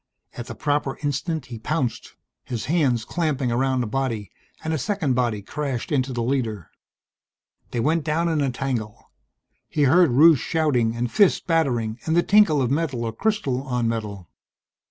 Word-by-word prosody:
At 120 - -7
the - - -7
proper 145 -2 -1
instant 150 +1 -2
he 120 -3 -8
pounced, 130 0 -3 0.3
his 120 -4 -4
hands 135 -8 +1
clamping 150 -7 -1
around 130 +1 +1
a - - -2
body, 115 -4 -3 0.3
and 160 - -2
a 155 - -1
second 160 -3 0
body 120 -5 0
crashed 140 +1 -4
into 135 -2 +1
the 120 -2 -2
leader. 115 - -2 1.0
They 120 - -3
went 155 +6 +1
down 160 +3 0
in 160 -3 +1
a 140 - +1
tangle. 125 -5 -4 0.6
He 150 - 0
heard 165 +5 +5
Rusche 150 +4 +6
shouting 130 -8 +1
and 120 0 -2
fists 200 -3 +4
battering 125 -9 0
and 160 - +2
the 175 - +4
tinkle 195 -9 +4
of 125 - -1
metal 140 -6 -1
or 115 - -3
crystal 140 - -1
on 125 -3 -1
metal. 105 -5 -4
135 Hz, 170 wpm, -23 LUFS, 120-155 Hz, 1.0 s, Rusche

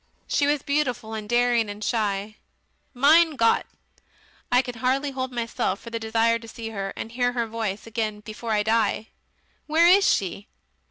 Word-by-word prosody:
"She 285 -1 +1
was 290 -1 +1
beautiful 275 -7 -1
and 215 -1 -6
daring 240 -2 +2
and 205 +1 -7
shy, 210 -1 -1 0.5
Mein 310 +5 +5
Gott! 230 -3 +2 0.8
I 250 +1 +4
can 245 -2 -7
hardly 270 +3 0
hold 260 -1 -4
myself 230 -4 -2
for 230 - -11
the 230 - -3
desire 225 +1 +1
to 230 - -12
see 225 0 -7
her 195 -3 -4
and 225 - -6
hear 245 +1 0
her 235 -1 0
voice 220 -3 -4
again 220 -2 -3
before 220 +2 -8
I 210 -1 +2
die. 220 0 +1 0.6
Where 320 +2 +4
is 390 +3 +6
she?... 195 +2 -2
230 Hz, 170 wpm, -24 LUFS, 220-255 Hz, 0.8 s, is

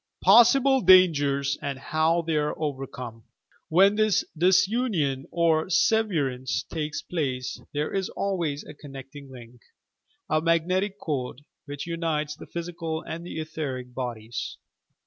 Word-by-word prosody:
POSSIBLE 250 +6 +6
DANGERS 145 -7 +4
AND 140 -3 -3
HOW 160 +4 +1
THEY 160 -2 0
ABB 150 0 -1
OVERCOME 130 -6 -5 0.5
When 195 +5 +5
this 215 -2 +2
disunion 180 - +2
or 165 0 +1
severance 155 - +1
takes 155 -2 -4
place, 130 -7 -3
there 150 +1 -2
is 195 -1 -1
always 170 -7 -2
a 150 - -11
connecting 140 -1 -11
link, 120 -2 -13 0.7
a 155 0 +1
"magnetic 185 +5 +1
cord," 140 -4 -4 0.2
which 145 -1 -6
unites 160 -3 -2
the - - -12
physical 170 -1 -5
and 165 +1 -6
the 175 - -6
etheric 140 -6 -5
bodies. 120 -3 -5
155 Hz, 125 wpm, -26 LUFS, 135-175 Hz, 0.7 s, POSSIBLE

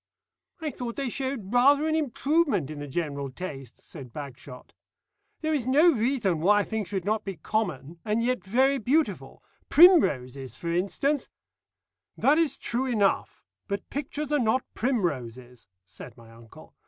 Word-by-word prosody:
"I 310 -2 -2
thought 240 -2 -6
they 275 -3 -2
showed 255 -5 -4
rather 280 +5 +5
an 315 - 0
improvement 295 - +1
in 150 - -7
the 145 - -6
general 140 -2 -3
taste," 135 -4 -9
said 135 -7 -11
Bagshot. 130 -2 -10 0.7
"There 315 0 0
is 265 -5 -1
no 300 +7 +5
reason 225 - 0
why 205 +5 +4
a - - -1
thing 220 -1 -3
should 190 -1 -4
not 215 +1 0
be 195 -3 -6
common, 170 - -3
and 220 +1 0
yet 250 +1 0
very 265 +7 +2
beautiful. 290 +7 -1 0.3
Primroses, 140 - +4
for 170 - -4
instance 255 - -1 0.4
" - - -57
"That 295 +4 +3
is 325 -3 +1
true 250 +3 -2
enough, 210 -6 0 0.2
but 200 -1 -5
pictures 295 +1 -4
are 295 - +3
not 245 +1 +1
primroses," 130 - -3 0.2
said 120 +5 -12
my 115 -1 -16
uncle. 115 0 -16
215 Hz, 155 wpm, -27 LUFS, -, 0.7 s, rather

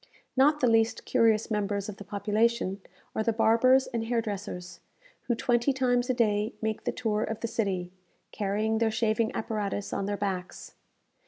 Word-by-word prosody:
Not 295 +3 +4
the 250 - +4
least 225 0 +2
curious 225 -2 +2
members 205 -1 -1
of 205 -2 -7
the - - -8
population 205 0 0 0.3
are - - +1
the 230 - +1
barbers 235 +4 +4
and 230 -2 -3
hair 235 0 +1
dressers, 195 -5 -5 0.5
who 240 - +2
twenty 240 +3 +2
times 245 -1 +1
a - - +3
day 215 -2 +1
make 220 -1 -3
the - - +1
tour 215 -3 -1
of 225 - -4
the 230 - -1
city, 190 -6 -2 0.4
carrying 215 +2 0
their 225 -1 +2
shaving 220 0 +1
apparatus 210 -3 -3
on 195 - -2
their 205 0 -2
backs. 190 -3 -4
220 Hz, 170 wpm, -28 LUFS, 205-235 Hz, 0.5 s, Not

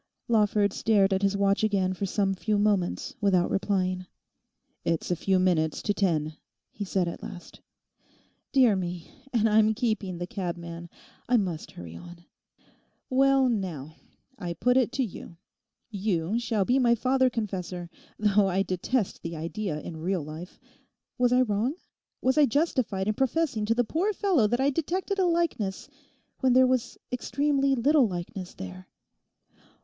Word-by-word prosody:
Lawford 210 -3 +2
stared 200 -3 +3
at 190 - 0
his 200 0 +1
watch 200 +1 +2
again 195 -3 +1
for 195 +2 -3
some 195 0 +1
few 210 +3 -1
moments 205 -4 0
without 185 -4 +2
replying. 185 -2 0 0.8
'It's 165 +1 -1
a - - +2
few 190 +3 +1
minutes 170 -4 +1
to 205 - +1
ten,' 160 -6 0 0.3
he 205 - -5
said 185 -2 0
at 170 - -5
last. 175 -2 -10 0.9
'Dear 250 -6 +5
me! 175 -2 -5 0.2
And 225 -2 +2
I'm 215 0 +4
keeping 215 -6 -1
the 175 - -3
cabman! 170 -2 -5 0.4
I 250 - +5
must 180 -7 -2
hurry 85 -1 -9
on. 170 - -12 0.9
Well, 270 0 +4
now, 175 - -3 0.5
I 175 -4 -3
put 250 +8 +1
it 255 -3 +3
to 265 0 +1
you; 175 -4 -10 0.5
you 200 0 -1
shall 225 -5 0
be 255 +5 +3
my 235 -2 +4
father 260 +2 +2
confessor—though 195 0 -2
I 190 +1 +1
detest 190 +4 -1
the 165 0 -5
idea 165 +1 -3
in 165 - -7
real 175 +1 -1
life—was 175 - -6
I 250 +1 +5
wrong? 225 +5 0 0.5
Was 260 +4 +3
I 290 - +6
justified 235 - 0
in 215 - +2
professing 265 -2 0
to 230 - +2
the 245 - +3
poor 350 - 0
fellow 360 - +2
that 240 +3 0
I 275 +2 +3
detected 370 +7 -2
a 375 - +4
likeness 335 - -1 0.5
when 260 -1 +3
there 260 +1 +6
was 255 -1 0
extremely 275 +2 +1
little 275 +1 +4
likeness 180 0 -6
there? 90 0 -9
205 Hz, 155 wpm, -27 LUFS, 180-250 Hz, 0.9 s, I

